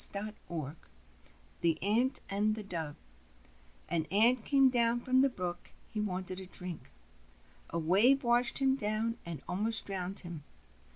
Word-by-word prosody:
JESOF'S 210 +1 +2 0.2
FABLES 155 -3 -5 0.9
THE 165 -2 +1
ANT 230 +6 +1
AND 210 +2 0
THE 215 - -7
DOVE 165 -7 -6 0.9
An 165 -2 -2
Ant 230 +4 +3
came 270 0 +3
down 240 -1 +1
to 255 +1 +2
the 275 - +3
brook: 180 -7 -7 0.2
he 215 - -4
wanted 185 -2 -4
to 190 - -10
drink. 180 -2 -3 0.8
A 170 - -4
wave 205 - +3
washed 240 0 +4
him 270 -1 +4
down 220 0 -2
and 165 -3 -7
almost 215 +5 +5
drowued 190 0 -3
him. 170 -4 -9
205 Hz, 150 wpm, -31 LUFS, 180-235 Hz, 0.9 s, almost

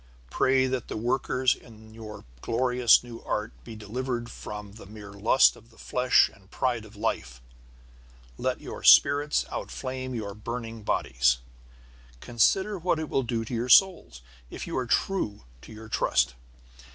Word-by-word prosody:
Pray 130 0 +3
that 130 -2 -3
the - - -5
workers 125 +2 +1
in 110 -2 -15
this - - -16
your 110 -1 -10 0.2
glorious 125 0 +3
new 120 -1 -10
art 105 +1 -3
be 115 - -10
delivered 120 +2 -4
from 105 -1 -8
the 105 -1 -13
mere 105 -1 -11
lust 105 +6 +4
of 115 +1 -19
the 115 - -23
flesh 125 0 +3
and 95 -1 -20
pride 120 -3 -2
of 110 0 -15
life. 65 - -3 1.0
Let - - -2
your - - -8
spirits 145 +1 +5
outflame 130 -1 -5
your 105 -3 -5
burning 115 +1 -6
bodies. 60 -10 +1 0.8
Consider 190 - +1
what 170 -1 0
it 155 -1 -4
will 135 - +1
do 115 -2 -3
to 115 - -8
your 120 +2 -2
souls, 150 - +4 0.3
if - - -7
you - - -5
are 125 -2 -2
true 115 - -1 0.2
to - - -14
your 110 0 -11
trust. 85 - +1
115 Hz, 160 wpm, -27 LUFS, 105-130 Hz, 1.0 s, spirits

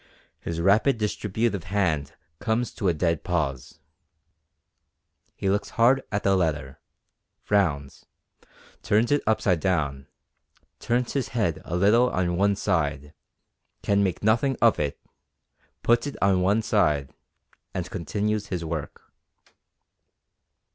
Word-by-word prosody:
His 85 0 -5
rapid 105 +9 +3
distributive 105 -2 -2
hand 80 -7 -1 0.3
comes 115 +2 -1
to 100 - -2
a 90 - +3
dead 85 0 0
pause. 70 -8 -2 1.6
He - - -3
looks 100 +2 0
hard 125 +4 +5
at 100 -1 -1
the 100 0 +3
letter, 75 -7 -1 0.6
frowns, 75 -9 -1 0.7
turns 110 +5 +2
it 145 - +3
upside 100 -5 +2
down, 75 -7 -1 0.7
turns 120 +1 -1
his 135 -4 -1
head 85 -8 0
a 85 - -3
little 110 +7 +4
on 90 -1 -1
one 100 +2 +2
side, 75 -7 -1 0.7
can 100 0 +2
make 95 -1 -2
nothing 115 +5 +2
of 115 -1 +4
it, 75 -2 -2 0.8
puts 120 +4 +3
it 145 - -5
on 95 -2 +3
one 100 +4 +2
side, 75 -11 +1 0.6
and 90 -1 -4
continues 105 +3 -2
his 90 -4 -4
work. 80 -3 -5
95 Hz, 120 wpm, -25 LUFS, 80-110 Hz, 1.6 s, hard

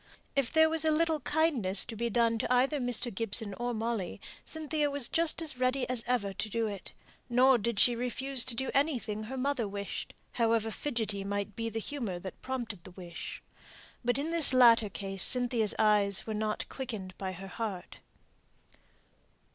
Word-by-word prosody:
If 275 -4 +1
there 320 0 +5
was 320 0 -1
a 315 - +4
little 320 0 +1
kindness 275 - +1
to 235 - -7
be 235 +2 -2
done 230 0 +2
to - - -2
either 265 +4 +2
Mr. 245 -1 -1
Gibson 210 0 +1
or 240 +4 -3
Molly, 225 -5 -3 0.2
Cynthia 305 -1 -2
was 280 -3 -1
just 330 0 +1
as 300 -5 -3
ready 255 +1 +1
as 245 -2 -1
ever 220 -6 0
to 210 +3 -4
do 230 +2 -1
it; 200 -4 -6 0.4
nor 250 +1 +5
did 225 0 -2
she 245 - +5
refuse 250 +2 -1
to 235 - -2
do 265 +3 -2
anything 255 -7 0
her 265 +4 -6
mother 255 -4 -1
wished, 200 0 -6 0.2
however 225 -1 +1
fidgety 220 -7 -2
might 200 0 -3
be 230 0 -3
the 225 - -6
humour 225 -6 -3
that 185 +1 -9
prompted 235 -8 -5
the - - -8
wish. 175 -2 -8 0.6
But 245 +1 +1
in 300 +4 -2
this 320 -6 +9
latter 230 -4 +6
case 195 -1 -4
Cynthia's 245 -3 +3
eyes 205 -2 +2
were 220 - -4
not 215 0 -2
quickened 215 -8 -6
by 190 -1 -4
her 190 +2 -9
heart. 195 -2 -6
235 Hz, 180 wpm, -30 LUFS, 205-265 Hz, 0.6 s, this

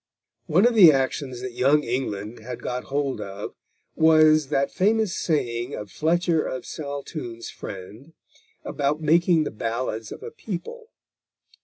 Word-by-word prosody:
One 180 +6 +4
of 240 - +4
the 195 -7 +9
notions 135 -2 0
that 130 0 -5
Young 140 +5 +3
England 115 -3 -3
had 120 +2 -8
got 125 0 -3
hold 140 -1 -2
of 100 +1 -6 0.4
was 155 -2 +5
that 140 -1 0
famous 215 0 +1
saying 120 -5 -1
of 105 -2 -8
Fletcher 165 +1 +1
of 130 - -5
Saltoun's 140 -5 -6
friend 105 - -9 0.5
about 145 +2 -1
making 165 +1 +4
the - - -4
ballads 115 0 -3
of - - -9
a - - -7
people. 335 - -7
140 Hz, 140 wpm, -24 LUFS, 120-160 Hz, 0.5 s, the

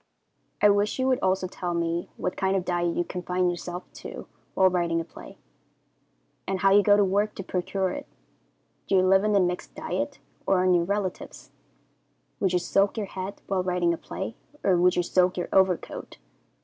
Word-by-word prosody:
I 210 - +8
wish 205 +1 +1
you 260 0 +1
would 255 - +2
also 185 0 +1
tell 175 -1 -4
me 170 0 -1
what - - -3
kind 190 0 0
of 185 -2 -1
diet 175 -1 0
you 175 - +2
confine 180 0 -1
yourself 175 +1 -6 0.2
to - - -8 0.3
while 190 - +5
writing 170 -2 +1
a - - -2
play, - - -13 1.1
and 190 -1 -2
how 195 - +5
you 205 +1 +7
go 205 +1 +5
to 205 - +5
work 205 +3 0
to 195 - -6
procure 185 +1 -1
it. 285 - -6 0.8
Do 195 - +2
you 185 - +5
live 190 +1 +5
on 210 -1 +2
a - - +5
mixed 180 -1 -2
diet, - - -3 0.3
or 185 -1 +3
on 185 0 +4
your 170 -1 +3
relatives? 200 -1 -4 0.9
Would 190 - +1
you 180 - +3
soak 195 +4 +1
your 215 - -1
head 190 +1 -7
while 190 -2 0
writing 180 -1 +1
a - - -3
play, 190 +6 -6 0.3
or 190 - +4
would 180 +1 +4
you 175 - +2
soak 180 +1 +2
your 175 - -3
overcoat? 190 -2 +1
185 Hz, 195 wpm, -26 LUFS, 180-195 Hz, 1.1 s, I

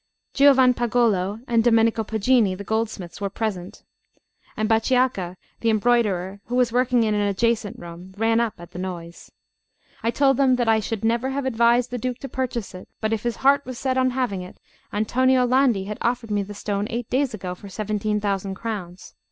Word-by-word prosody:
Giovanpagolo 240 -7 +3
and 230 -1 +2
Domenico 225 -1 +3
Poggini, 220 -2 +2
the 200 - -7
goldsmiths, 210 -4 -3
were 200 - -1
present; 200 -2 -4 0.7
and 215 - 0
Bachiacca, 225 -5 +1 0.2
the 230 - +1
embroiderer, 210 -4 +1
who 245 - -4
was 250 -2 +2
working 245 0 +2
in 215 -1 +1
an 210 - +1
adjacent 210 +1 0
room, 175 +2 -11
ran 225 +1 +2
up 230 -2 0
at 175 0 -12
the 180 - -8
noise. 175 -2 -7 0.7
I 230 - 0
told 270 +1 +3
them 265 -2 +4
that 240 -2 -1
I 220 0 +4
should 220 0 -3
never 235 +3 +1
have 275 0 -3
advised 235 0 +2
the 245 - -3
Duke 250 +1 -3
to 275 - -5
purchase 245 -6 -3
it; 185 - -11
but 220 0 -1
if 220 - -1
his 240 0 -2
heart 280 +1 +5
was 255 -1 -7
set 260 0 -1
on 260 0 +3
having 245 -7 -2
it, 180 - -10 0.3
Antonio 255 +4 +2
Landi 250 -5 +3
had 210 +2 -6
offered 235 -2 -1
me 205 -1 +1
the 205 +1 -7
stone 205 0 -2
eight 235 0 -4
days 260 -2 +1
ago 185 -3 -5
for 200 +2 -11
17,000 205 -1 -2
crowns. 190 -5 -6
225 Hz, 185 wpm, -23 LUFS, 200-245 Hz, 0.7 s, heart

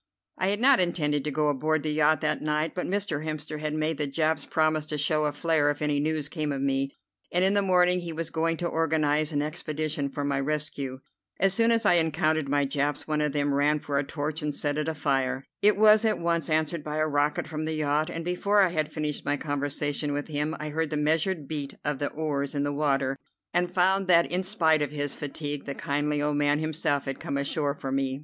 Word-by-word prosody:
I 185 - +1
had 205 +2 0
not 265 +2 +5
intended 150 -5 0
to - - 0
go 150 +1 +1
aboard 155 +2 0
the 155 - -1
yacht 155 +1 +3
that 150 -2 0
night, 150 +1 -1
but 180 - -3
Mr. 190 -6 -1
Hemster 155 -1 -5
had 155 0 -3
made 155 -1 -1
the 150 - 0
Japs 155 +1 0
promise 155 -1 +1
to 150 - -3
show 150 +1 +1
a 150 - +1
flare 150 0 +1
if 145 - -2
any 150 -1 0
news 155 0 0
came 150 -1 -3
of 140 - -2
me, 135 0 0 0.4
and 180 +1 +2
in 195 - +3
the 205 - +3
morning 180 -1 +3
he 175 -1 -6
was 165 0 -4
going 165 0 0
to 175 - -2
organize 155 -2 +1
an 145 -1 0
expedition 155 -2 -3
for 145 +1 -4
my 140 -1 0
rescue. 140 -2 -2 0.4
As 195 0 +4
soon 230 +3 +3
as 230 -1 +2
I 175 - +5
encountered 155 -2 0
my 145 0 +2
Japs 145 +1 -1
one 155 -1 0
of 150 -1 +1
them 145 0 0
ran 145 +2 +3
for 140 -1 -1
a - - 0
torch 150 +2 -4
and 150 0 -1
set 145 0 -1
it 150 - -2
afire. 135 -4 -1 0.2
It 210 0 +5
was 215 +1 +6
at 220 -1 +2
once 170 -2 -1
answered 155 0 0
by 150 0 -4
a 155 - +2
rocket 145 0 0
from 155 0 -4
the 160 0 -2
yacht, 150 0 0
and 165 0 -5
before 200 +4 +2
I 185 - +3
had 155 -3 -2
finished 150 -2 -2
my 145 - 0
conversation 145 0 -2
with 145 +2 -3
him 150 +1 -1
I 150 - -4
heard 160 +1 -1
the 150 - -2
measured 155 +1 0
beat 145 -3 -4
of 145 -2 -1
the 145 - -1
oars 145 -2 -3
in 140 - 0
the 145 0 -1
water, 140 -2 0 0.3
and 175 0 +1
found 190 +1 +2
that 170 -2 +4
in 180 +1 +1
spite 165 -5 +2
of 145 - 0
his 145 -1 -3
fatigue 145 0 -5
the 140 - -5
kindly 145 +1 -1
old 150 0 0
man 145 0 +2
himself 155 -2 -1
had 135 -1 -4
come 140 - -3
ashore 140 +1 -1
for 135 -2 -5
me. 135 0 -1
150 Hz, 235 wpm, -27 LUFS, 145-160 Hz, 0.4 s, was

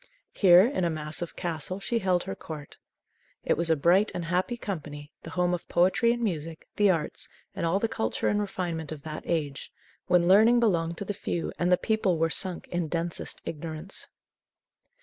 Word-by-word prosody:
Here, 180 -3 +7
in 240 -7 -1
a 170 - +2
massive 155 +2 -4
castle, 175 +1 -3
she 230 +3 -1
held 185 -3 +1
her - - -4
court. 150 +6 -9 0.6
It - - +2
was 170 0 0
a 160 - +5
bright 175 +8 +4
and 175 - -3
happy 180 +8 0
company, 150 -8 -6
the - - -9
home 180 +1 +1
of 175 - -4
poetry 190 +7 +3
and 240 0 -2
music, 165 -5 -3
the 205 -1 +4
arts, 165 -5 0 0.2
and - - -2
all 170 +4 +2
the 225 - +1
culture 225 0 -2
and 210 - +2
refinement 175 -6 -3
of 150 -3 -7
that 155 -1 -6
age, 150 -5 -2 0.4
when 175 -1 +4
learning 220 +6 +6
belonged 170 -7 +1
to 200 - -5
the 205 - -2
few 170 -3 -3
and 175 +1 +1
the 180 - +6
people 215 -5 +1
were 165 0 +1
sunk 185 0 -2
in 175 -2 -1
densest 170 +1 -3
ignorance. 160 +3 -6
175 Hz, 190 wpm, -27 LUFS, 160-195 Hz, 0.6 s, Here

